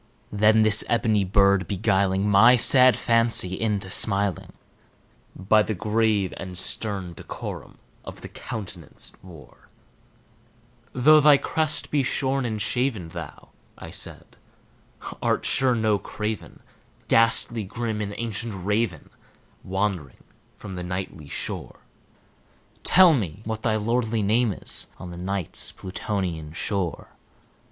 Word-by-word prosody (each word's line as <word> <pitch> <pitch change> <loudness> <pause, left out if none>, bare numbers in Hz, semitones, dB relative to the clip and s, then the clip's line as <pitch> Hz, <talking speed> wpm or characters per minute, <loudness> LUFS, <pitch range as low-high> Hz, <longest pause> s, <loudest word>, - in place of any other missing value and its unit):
Then 110 +1 +4
this 110 0 +5
ebony 110 -3 +1
bird 100 -1 +2
beguiling 100 -1 0
my 110 +5 +6
sad 125 0 +5
fancy 115 -5 +1
into 100 -2 -2
smiling, 100 -3 +3 0.8
By 105 +3 +3
the 105 0 -2
grave 105 -1 0
and 90 -1 -7
stern 95 -2 -1
decorum - - -8 0.3
of - - -10
the - - -8
countenance 95 -6 -8
it - - -27
wore, 85 -5 -16 1.2
"Though 155 +5 +5
thy 150 -1 +6
crest 155 +1 -2
be 145 - +2
shorn 135 0 -1
and 110 -2 -4
shaven, 120 -7 -1
thou," - - -10 0.3
I - - -10
said, - - -7 0.8
"art - - 0
sure 130 -1 +3
no 110 -3 +1
craven, 105 +2 -6 0.5
Ghastly 115 0 +2
grim 110 +1 -4
and 100 0 -5
ancient 115 -1 -4
Raven 105 -6 -2 0.5
wandering 95 -8 -3 0.3
from 100 - -9
the 90 -1 -6
Nightly 90 -4 -6
shore, - - -5 1.0
Tell 180 -2 +6
me 100 - -3
what 110 0 -4
thy 110 -2 0
lordly 115 0 -1
name 110 +3 +2
is - - 0
on 90 -1 -9
the 85 - -9
Night's 95 -1 -1
Plutonian 90 -5 -5
shore!" 90 -2 -3
105 Hz, 125 wpm, -24 LUFS, 95-115 Hz, 1.2 s, my